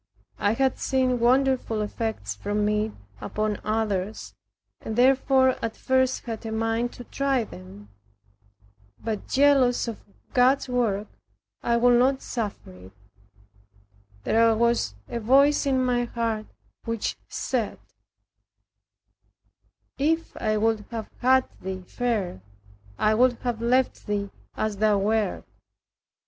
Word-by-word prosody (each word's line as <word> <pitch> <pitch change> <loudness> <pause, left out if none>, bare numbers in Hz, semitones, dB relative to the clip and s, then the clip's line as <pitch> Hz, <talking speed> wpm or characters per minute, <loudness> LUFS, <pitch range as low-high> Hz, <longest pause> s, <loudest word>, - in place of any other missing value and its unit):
I 205 - +2
had 265 +2 +1
seen 255 -2 +1
wonderful 255 -2 +2
effects 210 - -3
from 205 - -1
it 210 +1 0 0.3
upon 215 - -2
others, 215 -2 -2 0.5
and 220 - -5
therefore 260 +1 +3
at 225 - -3
first 260 0 +1
had 225 -3 -6
a 225 - -5
mind 225 +2 0
to 245 - -9
try 270 0 0
them. 95 - -12 1.1
But, 220 -2 -4
jealous 270 -3 +3
of 230 - -6 0.3
God's 260 +2 +3
work, 225 -5 0 0.6
I 235 0 +1
would 240 0 +5
not 265 +2 +2
suffer 215 - -4
it. 90 +1 -14 1.3
There 225 - +4
was 235 - +1
a 235 - -4
voice 275 +6 +4
in 260 -2 +2
my 245 -1 +1
heart 230 -2 -2 0.4
which 230 -2 -2
said, - - -2 2.2
"If 325 +4 0
I 215 -1 0
would 220 0 +1
have 225 -2 -6
had 260 +1 +4
thee 185 0 -5
fair, 205 - -2 0.6
I 215 - +3
would 250 +3 +4
have 240 -3 -2
left 250 +1 +1
thee 200 -1 -2 0.3
as 215 -2 -1
thou 210 0 +3
wert." 210 0 0
230 Hz, 120 wpm, -25 LUFS, 215-255 Hz, 2.2 s, would